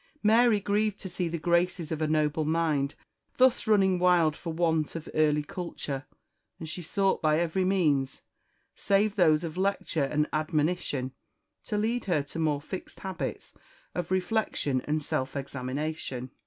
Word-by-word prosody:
Mary 225 0 +5
grieved 205 +1 0
to - - -6
see 180 -1 -2
the 170 +1 -3
graces 170 0 +1
of 160 -1 -2
a 155 - +2
noble 155 0 +1
mind 155 -3 0 0.4
thus 255 -2 +4
running 190 -4 +4
wild 175 -4 +4
for 165 - -5
want 160 -2 0
of 165 - -6
early 150 -1 +3
culture; 145 -4 -5 0.5
and 160 - -7
she 170 +3 -5
sought 195 +3 0
by 155 0 +3
every 175 +2 0
means, 150 -8 +1 0.5
save 200 +1 +1
those 160 -4 +4
of 165 0 -5
lecture 190 -6 0
and 150 +2 0
admonition 155 -3 0 0.5
to 210 - -2
lead 230 +3 0
her 170 -7 +1
to 145 +3 -8
more 150 -3 +1
fixed 185 +5 -8
habits 190 -1 -5 0.4
of 175 -2 -3
reflection 185 - 0
and 155 0 -1
self 130 -1 -2
examination. 135 -1 -4
165 Hz, 155 wpm, -28 LUFS, 150-190 Hz, 0.5 s, Mary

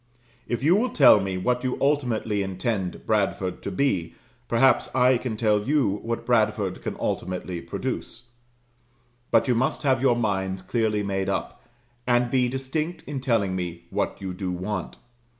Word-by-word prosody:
If 120 +1 -2
you 165 +5 +5
will 240 +5 +2
tell 135 - +7
me 95 -1 -2
what 125 +6 0
you 130 -1 -1
ultimately 120 -7 +1
intend 95 0 -3
Bradford 100 -3 0
to - - -4
be, 100 -13 0 0.3
perhaps - - +3
I 125 0 +4
can 120 -4 -4
tell 105 -2 +2
you 135 -9 +2
what 115 0 -3
Bradford 110 -5 +1
can - - -4
ultimately 90 -1 -3
produce. 120 +7 -5 1.0
But - - +3
you 125 - +3
must 125 +5 0
have 130 -3 +2
your 130 -3 +4
minds 95 -4 -1
clearly 105 0 0
made 95 -1 -1
up, 100 - -3 0.5
and 120 -1 +2
be 125 -2 +2
distinct 135 +6 -3
in 140 -2 -5
telling 115 -8 +1
me 85 -2 -4
what - - -2
you 95 -2 -5
do 90 0 -3
want. 95 +1 -4
110 Hz, 160 wpm, -25 LUFS, 95-125 Hz, 1.0 s, tell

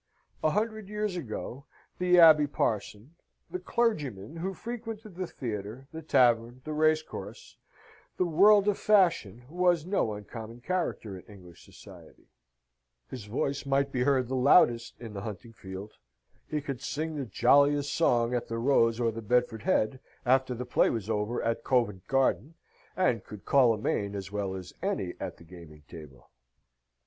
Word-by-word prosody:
A 155 - +4
hundred 215 +2 -2
years 210 -2 -2
ago, 135 -1 -6 0.3
the 180 0 +4
Abbe 155 -3 +8
Parson, 110 0 -3 0.4
the 180 - -3
clergyman 155 - -2
who 190 +3 -4
frequented 225 -2 -7
the 185 +1 -4
theatre, 110 0 -6
the 160 - -6
tavern, 120 -5 +2
the 155 - -4
racecourse, 155 +1 -1 0.6
the 180 - +2
world 200 +5 +5
of 205 - +1
fashion, 170 - +2
was 175 0 +1
no 175 - 0
uncommon 115 +3 -9
character 140 - -3
in - - -17
English 90 -4 -15
society: - - -15 0.9
his 120 -6 -7
voice 135 +6 -2
might 140 0 +1
be 125 - -1
heard 130 -1 +2
the 130 - -3
loudest 125 -3 +4
in 115 -3 -8
the 100 - -6
hunting 110 +3 -8
field; 95 0 -9 0.6
he 150 -1 -2
could 135 -3 -5
sing 155 +3 -3
the 140 -3 -3
jolliest 145 +6 +3
song 120 -7 +2
at 120 - -2
the 115 - -4
Rose 115 -2 +2
or 115 -1 +1
the 115 +1 -7
Bedford 120 0 0
Head, 120 +6 +1 0.3
after 130 0 +2
the 125 +2 -5
play 120 - +2
was 110 -2 -3
over 105 +3 -1
at 115 0 -1
Covent 110 -8 0
Garden, 135 +3 +1 0.4
and 180 -11 +1
could 105 -2 -11
call 130 -4 +5
a 110 - 0
main 100 -1 -2
as 100 -1 -6
well 100 -2 -3
as 95 -1 -8
any 190 - -2
at 95 -3 -6
the - - -15
gaming 80 -3 -14
table. 75 -7 -13
125 Hz, 160 wpm, -29 LUFS, 110-160 Hz, 0.9 s, Abbe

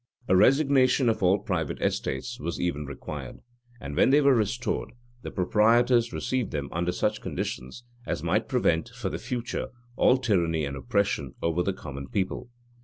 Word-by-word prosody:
[] 125 - -32
A 95 - +4
resignation 135 +2 +4
of 110 -1 -1
all 95 +1 +4
private 90 -6 -3
estates 65 0 -2
was 85 +3 -4
even 75 -5 -2
required; 70 - -7 0.4
and 70 -7 -6
when - - +4
they 140 +2 +6
were 140 -2 +5
restored, 115 +1 -1 0.3
the - - -6
proprietors 115 +5 +3
received 130 -4 -2
them 70 -3 -4
under 85 +1 -1
such - - -1
conditions 65 - -5 0.2
as - - -2
might - - 0
prevent, 80 +8 +1
for 120 0 -4
the - - -5
future, 125 -1 -3 0.3
all 125 - +4
tyranny 85 - +1
and 70 0 -4
oppression 70 +1 -1
over 85 +1 +1
the 95 - 0
common 70 -6 -8
people. 95 - -3
100 Hz, 170 wpm, -27 LUFS, 80-120 Hz, 0.4 s, they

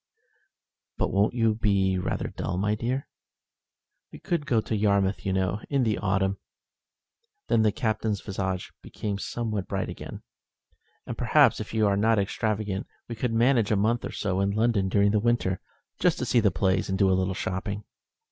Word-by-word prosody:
"But - - -1
won't 100 +4 +2
you 115 -2 +3
be 100 -3 +1
rather 90 - -2
dull, 90 +1 -4
my 105 +3 +1
dear?" 125 +5 -2 1.0
"We - - -10
could 165 -4 -2
go 115 - +3
to 110 - -2
Yarmouth, 100 -2 +1
you - - +1
know, 95 +2 0
in 140 -3 +2
the 110 -3 0
autumn." 95 0 0 1.1
Then 115 - +4
the 110 -1 +3
Captain's 110 -1 -1
visage 95 -2 -3
became 100 -2 -4
somewhat 110 -3 -3
bright 95 -1 -2
again. - - -8 0.8
"And - - -6
perhaps, - - +4
if - - -6
you 110 -1 +3
are 100 -1 +2
not 110 +2 +3
extravagant, 105 -1 -1 0.2
we 120 - -5
could 115 +1 -2
manage 115 -1 +3
a 105 - +3
month 110 +4 +1
or - - -4
so 95 -2 -2
in 100 0 +2
London 105 -2 +1
during 100 +1 +3
the 105 - +2
winter, 110 -5 0 0.4
just - - +3
to - - -2
see 120 - +3
the 105 -3 +4
plays 95 0 0
and 95 - 0
do 95 - +4
a - - +4
little 95 0 0
shopping." 100 +3 -3
105 Hz, 180 wpm, -26 LUFS, 95-110 Hz, 1.1 s, Then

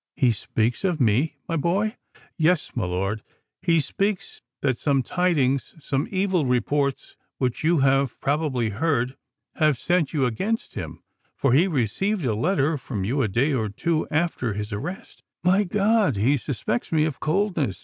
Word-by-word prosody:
"He 125 -3 +3
speaks 115 - -1
of 180 -5 0
me, 125 +6 +2
my 165 - -1
boy——" 200 - 0 0.4
"Yes: 165 0 +1
my 115 -6 0
lord—he 105 - -2
fears 200 +7 -2 0.2
that 130 -3 +1
some 140 -3 +2
tidings—some 145 -4 0
evil 185 -3 +1
reports 140 +3 0 0.2
which 125 +1 -1
you 165 -2 +3
have 135 -1 +2
probably 140 -5 0
heard, 130 +2 0 0.4
have 155 -4 +3
set 175 +1 +1
you 145 -5 +1
against 195 - -2
him—for 135 -3 -4
he 165 +8 +5
received 170 - 0
a 115 - +1
letter 150 - +1
from 110 -5 -4
you 130 +8 0
a 115 - +2
day 125 +9 +1
or 110 -5 0
two 155 +10 -1
after 155 -8 0
his 105 +1 -4
arrest——" 165 - -6 0.2
"My 190 +3 +4
God! 205 - +2
he 115 +9 +3
suspects 120 -3 -3
me 155 -2 +3
of 155 -4 -3
coldness!" 155 - 0
145 Hz, 150 wpm, -24 LUFS, 125-175 Hz, 0.4 s, he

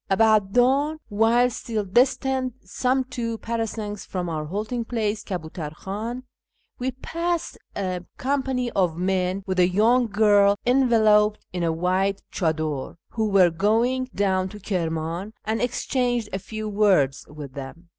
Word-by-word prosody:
About 210 -1 +3
dawn, 275 +5 +3
while 225 +3 +4
still 220 -2 -3
distant 255 +4 +1
some 255 +7 0
two 235 -3 -4
parasangs 220 -3 -4
from 180 -2 -4
our 155 -2 -3
halting 215 +8 -3
place, 220 -3 -2
Kabutar 160 -4 -5
Kh;in, 225 +8 -5 0.6
we 250 +1 -1
passed 335 +6 -3 0.2
a 185 -2 -2
company 260 -2 -1
of 180 -4 +1
men, 185 +1 0
with 185 -1 -1
a 180 - +6
young 230 +6 +3
girl 205 -1 +4
enveloped 220 -5 +4
in 180 - -2
a 165 -1 +1
white 185 +4 0
chddar, 155 -5 -1
who 220 -2 -1
were 190 -3 +5
going 230 +9 +1
down 190 -1 +1
to 210 - -10
Kirman, 170 0 -3
and 220 +1 -1
exchanged 245 -2 0
a 190 - -1
few 215 +2 -6
words 195 -10 +2
with 145 -3 -9
them. 140 +6 -9
210 Hz, 140 wpm, -24 LUFS, 185-240 Hz, 0.6 s, a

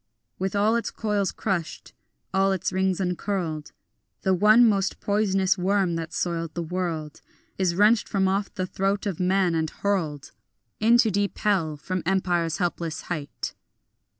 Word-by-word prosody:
With 190 +2 -2
all 210 +3 +3
its 235 - -1
coils 205 -3 -1
crushed, 180 -6 -3 0.4
all 195 0 +3
its 190 0 -1
rings 190 0 +1
uncurled, 180 -4 -2 0.5
The 190 - +3
one 215 +5 +6
most 200 -3 +1
poisonous 195 -2 +1
worm 190 -1 +1
that 165 0 -4
soiled 165 -1 -2
the 170 - -2
world 165 -3 -4 0.4
Is 180 -3 +1
wrenched 210 +4 +4
from 190 -1 +1
off 195 +1 0
the 185 - -1
throat 195 +3 -1
of 195 -5 -3
man, 185 -1 +2
and 160 -1 0
hurled 160 -9 -2 0.5
Into 230 +1 +4
deep 200 +1 -1
hell 170 -8 0
from 185 +5 -3
empire's 175 -3 0
helpless 170 -3 -2
height. 145 -4 -5
190 Hz, 150 wpm, -25 LUFS, 170-200 Hz, 0.5 s, one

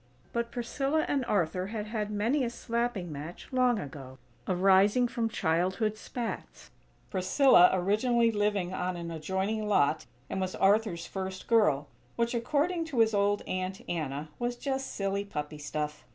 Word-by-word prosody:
But 235 0 -1
Priscilla 270 +6 -1
and 275 -2 +1
Arthur 185 -3 0
had 210 0 -4
had 215 -1 -3
many 225 +7 +1
a 240 - 0
"slapping 235 -6 -2
match" 150 +4 -8
long 250 -2 +3
ago, 135 -6 -8 0.3
arising 195 +6 +4
from 235 -2 -1
childhood's 190 +5 0
spats; 240 -2 -6 0.4
Priscilla 190 +1 +6
originally 225 +6 +2
living 205 -4 0
on 180 -1 -2
an 170 -1 -5
adjoining 190 +7 -2
lot, 155 -6 +2 0.2
and 190 - -3
was 185 0 -2
Arthur's 195 -4 +2
"first 190 -1 -5
girl;" 155 -12 +3 0.3
which 235 +1 0
according 305 +8 0
to 310 -6 -6
his 225 -1 +4
old 205 0 +2
Aunt 185 +1 -3
Anna, 150 -2 -3
"was 240 0 -1
just 265 +1 -3
silly 195 0 -1
puppy 150 -6 -5
stuff!" 150 0 -4
205 Hz, 150 wpm, -29 LUFS, 180-235 Hz, 0.4 s, Priscilla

